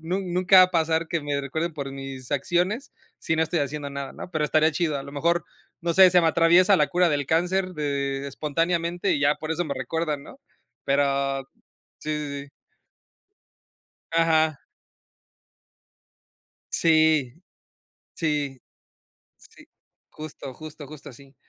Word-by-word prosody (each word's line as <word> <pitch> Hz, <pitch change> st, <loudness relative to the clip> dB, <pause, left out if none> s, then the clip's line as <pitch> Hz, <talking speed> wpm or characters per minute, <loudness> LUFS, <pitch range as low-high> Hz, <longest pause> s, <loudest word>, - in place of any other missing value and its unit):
nun 180 Hz, +2 st, -3 dB
nunca 185 Hz, +1 st, +5 dB
va -, -, +10 dB
a 185 Hz, -, +3 dB
pasar, 160 Hz, -1 st, +1 dB
que 170 Hz, 0 st, -2 dB
me 145 Hz, -1 st, -2 dB
recuerden 160 Hz, +4 st, -3 dB
por 140 Hz, -2 st, -5 dB
mis 135 Hz, -1 st, -7 dB
acciones, 180 Hz, -, -1 dB, 0.3 s
si 160 Hz, -, -1 dB
no 160 Hz, -, +3 dB
estoy 165 Hz, +1 st, -1 dB
haciendo 145 Hz, 0 st, -3 dB
nada 140 Hz, -1 st, -6 dB
¿no? 180 Hz, -, -9 dB
Pero 155 Hz, -2 st, 0 dB
estaría 155 Hz, +1 st, +3 dB
chido. 155 Hz, -2 st, -1 dB
A -, -, -6 dB
lo 140 Hz, 0 st, -10 dB
mejor, 170 Hz, +3 st, 0 dB, 0.4 s
no 170 Hz, -1 st, 0 dB
sé, 190 Hz, +1 st, +8 dB
se 180 Hz, 0 st, +5 dB
me 165 Hz, -, +4 dB
atraviesa 175 Hz, +4 st, +5 dB
la -, -, +4 dB
cura 175 Hz, -2 st, +2 dB
del 145 Hz, -2 st, -1 dB
cáncer 180 Hz, +3 st, 0 dB
de 140 Hz, -2 st, -2 dB
espontáneamente, 170 Hz, +5 st, -1 dB
y 140 Hz, -, 0 dB
ya 145 Hz, +1 st, +3 dB
por 155 Hz, -, -7 dB
eso 170 Hz, +1 st, -1 dB
me 140 Hz, -, -3 dB
recuerdan, 150 Hz, +2 st, -3 dB
¿no? 270 Hz, -, -14 dB, 0.4 s
Pero, 140 Hz, -1 st, +1 dB, 0.6 s
sí, 155 Hz, -, -5 dB
sí, 140 Hz, -2 st, -5 dB
sí. 140 Hz, -, -17 dB, 1.6 s
Ajá. 160 Hz, -2 st, +2 dB, 2.1 s
Sí, 155 Hz, -5 st, +3 dB, 0.8 s
sí, 145 Hz, -5 st, -2 dB, 0.8 s
sí, -, -, -18 dB, 0.5 s
justo, 155 Hz, -4 st, -8 dB
justo. 155 Hz, +1 st, -10 dB
Justo 150 Hz, 0 st, -11 dB
así. 135 Hz, +1 st, -15 dB
155 Hz, 150 wpm, -25 LUFS, 140-170 Hz, 2.1 s, va